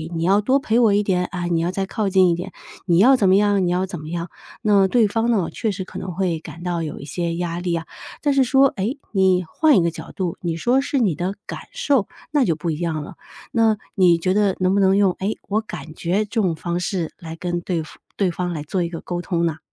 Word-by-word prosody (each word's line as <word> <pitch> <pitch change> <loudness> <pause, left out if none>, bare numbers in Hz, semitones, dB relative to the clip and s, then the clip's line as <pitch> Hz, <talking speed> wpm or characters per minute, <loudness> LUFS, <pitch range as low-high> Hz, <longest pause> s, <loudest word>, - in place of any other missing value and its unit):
你 165 - -1
要 195 +4 +4
多 260 +6 +3
陪 230 -3 +1
我 225 -4 +5
一 205 - +2
点， 180 -3 +1
啊， 180 -1 -4
你 170 -1 +1
要 170 +2 0
再 195 +1 -2
靠 205 +1 -2
近 185 -1 +5
一 170 - +2
点， 180 +3 -6 0.4
你 170 -2 +4
要 250 +9 +7
怎 200 -7 +3
么 190 - +6
样， 200 -2 +3
你 - - +1
要 180 +1 +1
怎 185 -3 -7
么 155 +1 -8
样。” 170 0 -4 0.3
那 200 -3 +4
对 230 +1 +3
方 225 +3 0
呢？ 200 -8 +2
确 225 -3 -2
实 190 -1 -4
可 - - -8
能 185 - -5
会 180 -3 0
感 165 +1 -10
到 175 -2 -1
有 155 -2 -5
一 - - -8
些 170 +1 -2
压 170 0 -3
力 175 -1 -1
啊。 165 0 -4 0.4
但 290 -2 +3
是 275 -1 +4
说， 265 +2 +5
诶， 215 +8 -1
你 190 -3 +3
换 305 - +3
一 180 - +4
个 170 - +1
角 160 0 -9
度， 180 -3 -3
你 170 -2 -2
说 245 +10 +2
是 280 0 -2
你 215 -9 +2
的 180 +6 -3
感 - - -6
受， 285 - +1 0.2
那 290 -2 +3
就 165 - +1
不 165 +1 -3
一 155 - -4
样 160 -3 -2
了。 - - -9 0.4
那 225 -2 +3 0.2
你 180 -3 +5
觉 185 +2 0
得 205 -2 +2
能 185 0 +2
不 200 - +2
能 195 0 +4
用， 200 -2 +4
诶， 200 +3 -2
“我 210 +2 +1
感 175 -8 -8
觉” 185 +6 0
这 220 +2 -1
种 180 -5 +1
方 170 +2 -3
式， 180 -2 -2
来 165 -1 -7
跟 175 0 -3
对 170 -2 -2
方 155 - -13 0.2
对 190 -3 +1
方 175 0 -3
来 150 -3 -4
做 180 +5 -2
一 170 - -3
个 165 -1 -7
沟 175 -1 -4
通 170 -1 -1
呢？ 160 -1 -2
185 Hz, 285 characters per minute, -21 LUFS, 170-205 Hz, 0.4 s, 要